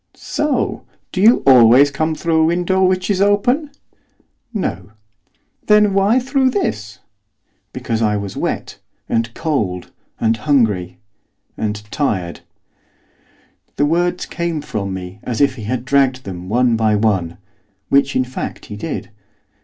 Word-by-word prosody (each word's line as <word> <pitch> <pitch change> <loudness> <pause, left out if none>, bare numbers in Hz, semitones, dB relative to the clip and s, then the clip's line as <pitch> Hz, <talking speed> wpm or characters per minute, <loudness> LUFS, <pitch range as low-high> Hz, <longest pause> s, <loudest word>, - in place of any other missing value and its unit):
'So! 300 -3 -2 0.3
Do 185 - -2
you 225 +4 +5
always 130 +2 +7
come 155 +3 -1
through 160 0 +1
a - - +4
window 180 +3 +1
which 185 0 +1
is 195 -1 0
open?' 245 +9 +2 0.8
'No.' 100 - -4 0.7
'Then 210 -1 +5
why 200 +5 +3
through 265 +1 +1
this?' 105 - -3 0.7
'Because 115 -1 -3
I 105 -2 +1
was 100 -2 -5
wet - - -4 0.3
and 115 +1 -1
cold 110 - -2 0.3
and 115 0 +1
hungry 110 -11 +1 0.6
and 105 -1 -3
tired.' 95 - -2 1.4
The 145 - +2
words 175 +3 0
came 170 -3 -3
from 100 -8 -4
me 95 +1 -7
as 120 -3 -4
if 140 -2 +3
he 115 -5 -9
had 125 +2 -3
dragged 130 -1 +2
them 90 -1 -7
one 120 +1 +2
by 110 -1 +2
one, 95 -6 0 0.5
which, 140 0 +2
in 130 - +2
fact, 130 0 -6
he - - -5
did. 120 +1 -5
130 Hz, 140 wpm, -18 LUFS, 105-175 Hz, 1.4 s, always